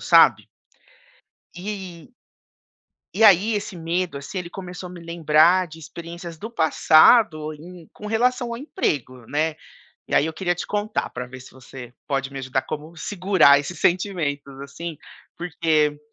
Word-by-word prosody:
sabe? -, -, +5 dB, 1.1 s
E 185 Hz, -2 st, -7 dB, 1.0 s
e 225 Hz, -, 0 dB
aí, 205 Hz, +2 st, +6 dB
esse 205 Hz, -2 st, -4 dB
medo, 170 Hz, -2 st, -2 dB
assim, 140 Hz, +7 st, -7 dB
ele 175 Hz, -1 st, -5 dB
começou 180 Hz, -1 st, -8 dB
a -, -, -11 dB
me 175 Hz, -, -10 dB
lembrar 170 Hz, +2 st, +3 dB
de 160 Hz, 0 st, -12 dB
experiências 170 Hz, +1 st, -9 dB
do 220 Hz, -, -6 dB
passado 160 Hz, -2 st, +4 dB
em 170 Hz, +1 st, -13 dB
com 210 Hz, -, -12 dB
relação 240 Hz, +3 st, +1 dB
ao 235 Hz, -, -4 dB
emprego, 135 Hz, -, -3 dB
né. 155 Hz, +2 st, -1 dB, 0.5 s
E -, -, -2 dB
aí, -, -, +4 dB
eu 160 Hz, -, -3 dB
queria 175 Hz, +1 st, -1 dB
te 175 Hz, -, -6 dB
contar 210 Hz, +1 st, -2 dB
para 125 Hz, 0 st, -6 dB
ver 130 Hz, +1 st, -11 dB
se 125 Hz, -, -13 dB
você 130 Hz, -1 st, -11 dB, 0.2 s
pode 135 Hz, -1 st, -2 dB
me 135 Hz, -, -6 dB
ajudar 130 Hz, 0 st, -2 dB
como 155 Hz, +3 st, -7 dB
segurar 180 Hz, -5 st, +4 dB
esses 160 Hz, +5 st, -7 dB
sentimentos, 155 Hz, -7 st, -1 dB
assim, 155 Hz, +4 st, -7 dB, 0.4 s
porque 160 Hz, -4 st, 0 dB
170 Hz, 155 wpm, -23 LUFS, 150-185 Hz, 1.1 s, aí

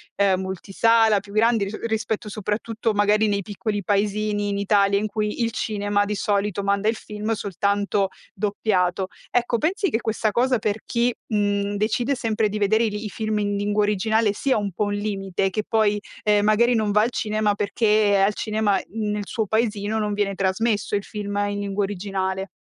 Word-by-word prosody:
ehm, 195 Hz, -2 st, +2 dB
multisala 210 Hz, +3 st, +2 dB
più 200 Hz, 0 st, -13 dB
grandi 225 Hz, -1 st, +3 dB
ris 200 Hz, +2 st, -5 dB
rispetto 220 Hz, -1 st, -2 dB
soprattutto 215 Hz, +2 st, -2 dB
magari 210 Hz, +1 st, +3 dB
nei 200 Hz, -1 st, 0 dB
piccoli 205 Hz, +1 st, -3 dB
paesini 205 Hz, +1 st, 0 dB
in 200 Hz, 0 st, -1 dB
Italia 200 Hz, 0 st, +3 dB
in 205 Hz, -, -1 dB
cui 210 Hz, +2 st, -2 dB
il 230 Hz, -, 0 dB
cinema 205 Hz, -2 st, 0 dB
di 210 Hz, +1 st, -2 dB
solito 200 Hz, -1 st, 0 dB
manda 200 Hz, +1 st, +1 dB
il 225 Hz, -, +2 dB
film 210 Hz, 0 st, -5 dB
soltanto 200 Hz, 0 st, 0 dB, 0.3 s
doppiato. 195 Hz, -2 st, 0 dB, 0.2 s
Ecco 240 Hz, -1 st, +1 dB
pensi 370 Hz, -, 0 dB
che 225 Hz, -, 0 dB
questa 220 Hz, -1 st, 0 dB
cosa 250 Hz, +4 st, +2 dB
per 215 Hz, -1 st, -1 dB
chi, 240 Hz, +1 st, +1 dB
mhmm, 205 Hz, -1 st, 0 dB
decide 235 Hz, +6 st, 0 dB
sempre 225 Hz, -3 st, 0 dB
di 210 Hz, -, -3 dB
vedere 220 Hz, +3 st, +3 dB
li 210 Hz, -1 st, -3 dB
i -, -, -3 dB
film 215 Hz, 0 st, -2 dB
in 205 Hz, -1 st, -1 dB
lingua 205 Hz, +1 st, +1 dB
originale 210 Hz, +1 st, +2 dB
sia 265 Hz, +4 st, +1 dB
un 205 Hz, -2 st, -2 dB
po' 210 Hz, +4 st, -1 dB
un 205 Hz, -, -2 dB
limite 195 Hz, -2 st, -1 dB
che 215 Hz, +3 st, -2 dB
poi, 215 Hz, -2 st, +2 dB, 0.2 s
ehm, 210 Hz, -1 st, +3 dB
magari 235 Hz, +3 st, +4 dB
non 215 Hz, -2 st, +1 dB
va 210 Hz, +1 st, +4 dB
al 230 Hz, +3 st, +1 dB
cinema 215 Hz, -2 st, 0 dB
perché 210 Hz, 0 st, +2 dB
al 205 Hz, -, +1 dB
cinema 215 Hz, -2 st, 0 dB
nel 210 Hz, -2 st, -2 dB
suo 220 Hz, -3 st, -1 dB
paesino 220 Hz, 0 st, 0 dB
non 210 Hz, -1 st, -1 dB
viene 205 Hz, -1 st, 0 dB
trasmesso 200 Hz, +3 st, 0 dB
il 200 Hz, -, -1 dB
film 205 Hz, -1 st, -5 dB
in 205 Hz, 0 st, -3 dB
lingua 200 Hz, 0 st, -1 dB
originale. 195 Hz, -1 st, -3 dB
210 Hz, 185 wpm, -23 LUFS, 200-220 Hz, 0.3 s, magari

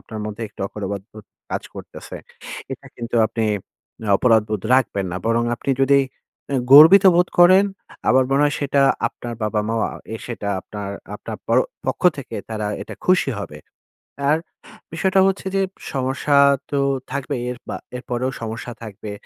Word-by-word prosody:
আপনার 110 Hz, -1 st, -8 dB
মধ্যে 110 Hz, +2 st, -6 dB
একটু -, -, -16 dB
অপরাধবোধ 100 Hz, +1 st, -7 dB, 0.3 s
কাজ -, -, -2 dB
করতেছে, -, -, -9 dB, 0.6 s
এটা -, -, -9 dB
কিন্তু 120 Hz, 0 st, -6 dB
আপনি 115 Hz, 0 st, -2 dB, 0.7 s
অপরাধবোধ 110 Hz, -4 st, +2 dB
রাখবেন 100 Hz, -7 st, +1 dB
না। -, -, -3 dB
বরং 115 Hz, +1 st, +2 dB
আপনি 135 Hz, -, -3 dB
যদি 140 Hz, +1 st, +5 dB, 0.5 s
অ্যা 140 Hz, -, -1 dB, 0.2 s
গর্বিত 165 Hz, +7 st, +10 dB
বোধ 180 Hz, +1 st, +3 dB
করেন, 185 Hz, +3 st, +7 dB, 0.4 s
আমার 130 Hz, 0 st, +5 dB
মনে 140 Hz, +2 st, +3 dB
হয় 145 Hz, -, +1 dB
সেটা 140 Hz, 0 st, +2 dB, 0.3 s
আপনার 120 Hz, -1 st, -8 dB
বাবা-মাও 110 Hz, +1 st, -1 dB
আ -, -, -8 dB, 0.2 s
এ -, -, -3 dB
সেটা 115 Hz, -4 st, -5 dB
আপনার 100 Hz, -2 st, -7 dB, 0.2 s
আপনার -, -, -7 dB
প -, -, -54 dB, 0.4 s
পক্ষ -, -, -2 dB, 0.2 s
থেকে 120 Hz, -4 st, -6 dB
তারা 105 Hz, -1 st, -3 dB, 0.2 s
এটা -, -, -9 dB
খুশি 185 Hz, -6 st, +3 dB
হবে। 85 Hz, -7 st, -7 dB, 0.7 s
আর 155 Hz, -, +4 dB, 0.6 s
বিষয়টা 190 Hz, +3 st, +2 dB
হচ্ছে 195 Hz, 0 st, -2 dB
যে 195 Hz, -, +2 dB, 0.3 s
সমস্যা 135 Hz, +2 st, 0 dB, 0.4 s
তো 140 Hz, -, +1 dB, 0.3 s
থাকবেই, 140 Hz, -2 st, -3 dB
এরপা 125 Hz, -, -7 dB, 0.2 s
এরপরেও 125 Hz, +1 st, -3 dB
সমস্যা 115 Hz, +2 st, -5 dB
থাকবে। 105 Hz, -1 st, -8 dB
120 Hz, 150 wpm, -21 LUFS, 110-140 Hz, 0.7 s, গর্বিত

